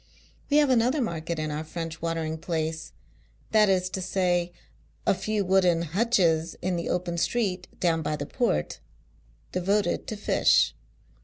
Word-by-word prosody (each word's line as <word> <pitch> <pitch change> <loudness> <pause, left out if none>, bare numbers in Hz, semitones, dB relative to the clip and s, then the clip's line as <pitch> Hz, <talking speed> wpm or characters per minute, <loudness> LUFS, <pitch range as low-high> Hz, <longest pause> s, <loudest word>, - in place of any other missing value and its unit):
We 290 - +4
have 295 -3 +4
another 250 +4 +3
market 170 - -2
in 155 -1 -2
our 150 +1 -3
French 165 0 -6
watering 160 -1 -2
place 160 -1 -3 0.3
— - - -34
that 215 -2 +5
is 185 -1 +2
to 190 - -3
say, 180 -2 0 0.5
ft 195 - +3
few 205 +1 -1
wooden 180 -3 +3
hutches 170 -3 +1
in 185 0 -1
the 170 - -3
open 175 -1 -1
street, 190 -4 -1
down 165 -2 +1
by 150 -1 -1
the 145 -1 -4
Port 75 - -1 0.4
— - - -34
devoted 200 +3 0
to 215 - -4
fish. 205 - +3
175 Hz, 160 wpm, -26 LUFS, 160-195 Hz, 0.5 s, that